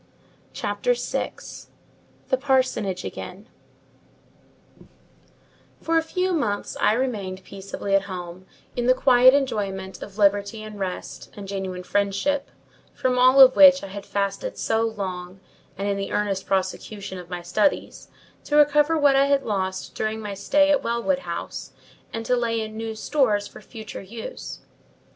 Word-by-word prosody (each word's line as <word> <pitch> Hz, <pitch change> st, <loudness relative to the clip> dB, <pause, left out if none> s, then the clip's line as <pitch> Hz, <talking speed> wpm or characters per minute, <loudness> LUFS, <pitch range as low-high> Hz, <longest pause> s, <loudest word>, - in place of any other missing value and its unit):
CHAPTER -, -, -1 dB
VI. -, -, -3 dB, 1.0 s
THE 260 Hz, -, +3 dB
PARSONAGE 255 Hz, -8 st, 0 dB
AGAIN 190 Hz, +4 st, -8 dB, 2.3 s
For 330 Hz, 0 st, +2 dB
a -, -, 0 dB
few 365 Hz, +3 st, -1 dB
months 215 Hz, -11 st, -1 dB
I -, -, +4 dB
remained 205 Hz, -7 st, -2 dB
peaceably 195 Hz, +1 st, -5 dB
at 195 Hz, 0 st, +3 dB
home, 180 Hz, 0 st, -7 dB, 0.3 s
in 245 Hz, 0 st, -1 dB
the 255 Hz, -, +5 dB
quiet 255 Hz, 0 st, +6 dB
enjoyment 195 Hz, -8 st, -2 dB
of 205 Hz, 0 st, -9 dB
liberty 205 Hz, +1 st, +2 dB
and 215 Hz, -1 st, -9 dB
rest, 185 Hz, -2 st, -5 dB
and 200 Hz, -1 st, -7 dB
genuine 190 Hz, -2 st, -4 dB
friendship, 205 Hz, +10 st, 0 dB, 0.5 s
from 250 Hz, -1 st, 0 dB
all 255 Hz, +2 st, +6 dB
of 260 Hz, -1 st, +9 dB
which 280 Hz, -1 st, +8 dB
I 195 Hz, -, -6 dB
had 200 Hz, +1 st, -8 dB
fasted 200 Hz, -, -2 dB
so 225 Hz, 0 st, 0 dB
long; 190 Hz, -4 st, -4 dB, 0.4 s
and 200 Hz, +1 st, -2 dB
in 200 Hz, -1 st, 0 dB
the 195 Hz, -, -4 dB
earnest 200 Hz, -2 st, -1 dB
prosecution 190 Hz, 0 st, -2 dB
of 175 Hz, -1 st, -11 dB
my 175 Hz, -1 st, -5 dB
studies, 210 Hz, +10 st, 0 dB, 0.4 s
to 295 Hz, -, -1 dB
recover 295 Hz, +2 st, +5 dB
what 285 Hz, -2 st, +4 dB
I 275 Hz, +1 st, +4 dB
had 280 Hz, -1 st, +2 dB
lost 190 Hz, -3 st, -3 dB
during 220 Hz, 0 st, -2 dB
my 210 Hz, -2 st, -5 dB
stay 290 Hz, +8 st, +3 dB
at 285 Hz, -, +3 dB
Wellwood 235 Hz, +4 st, 0 dB
House, -, -, -6 dB, 0.4 s
and 225 Hz, 0 st, -5 dB
to 250 Hz, -, +2 dB
lay 230 Hz, -2 st, 0 dB
in 215 Hz, 0 st, -5 dB
new 225 Hz, 0 st, -4 dB
stores 215 Hz, -4 st, +1 dB
for -, -, -13 dB
future 220 Hz, -3 st, -9 dB
use. 230 Hz, -, -8 dB
215 Hz, 150 wpm, -24 LUFS, 195-265 Hz, 2.3 s, of